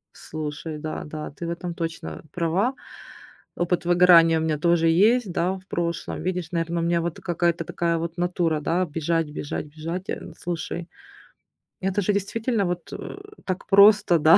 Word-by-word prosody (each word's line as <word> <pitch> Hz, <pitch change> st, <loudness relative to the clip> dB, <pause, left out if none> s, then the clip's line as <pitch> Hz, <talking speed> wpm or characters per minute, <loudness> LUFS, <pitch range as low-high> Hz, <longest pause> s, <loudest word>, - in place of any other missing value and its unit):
Слушай, 155 Hz, 0 st, -5 dB
да, 155 Hz, +1 st, -5 dB
да. 155 Hz, 0 st, -6 dB
Ты 170 Hz, +4 st, -6 dB
в -, -, -3 dB
этом 170 Hz, 0 st, -4 dB
точно 165 Hz, -1 st, -5 dB
права. 180 Hz, +9 st, 0 dB, 0.8 s
Опыт 175 Hz, 0 st, 0 dB
выгорания 175 Hz, -2 st, +6 dB
у -, -, -1 dB
меня 155 Hz, -2 st, 0 dB
тоже 170 Hz, 0 st, +3 dB
есть, 205 Hz, +5 st, +4 dB
да, 175 Hz, +2 st, 0 dB
в 190 Hz, 0 st, -10 dB
прошлом. 170 Hz, -2 st, -3 dB
Видишь, 180 Hz, -2 st, -2 dB
наверно, 170 Hz, 0 st, -1 dB
у -, -, -1 dB
меня 170 Hz, 0 st, +2 dB
вот 170 Hz, -1 st, -3 dB
какая-то 170 Hz, -1 st, 0 dB
такая 170 Hz, +1 st, 0 dB
вот 170 Hz, +1 st, -4 dB
натура, 175 Hz, -3 st, 0 dB
да: 180 Hz, +4 st, +1 dB
бежать, 165 Hz, +1 st, -1 dB
бежать, 150 Hz, 0 st, -4 dB
бежать. 165 Hz, +5 st, -6 dB
Э, 165 Hz, -, -5 dB
слушай, 170 Hz, 0 st, -4 dB, 0.9 s
это 195 Hz, +2 st, 0 dB
же 205 Hz, +2 st, +1 dB
действительно 210 Hz, +2 st, 0 dB
вот, 175 Hz, -1 st, -4 dB
э, -, -, -7 dB, 0.3 s
так 185 Hz, 0 st, -3 dB
просто, 200 Hz, -2 st, +7 dB
да. 155 Hz, +2 st, +7 dB
170 Hz, 165 wpm, -24 LUFS, 165-180 Hz, 0.9 s, просто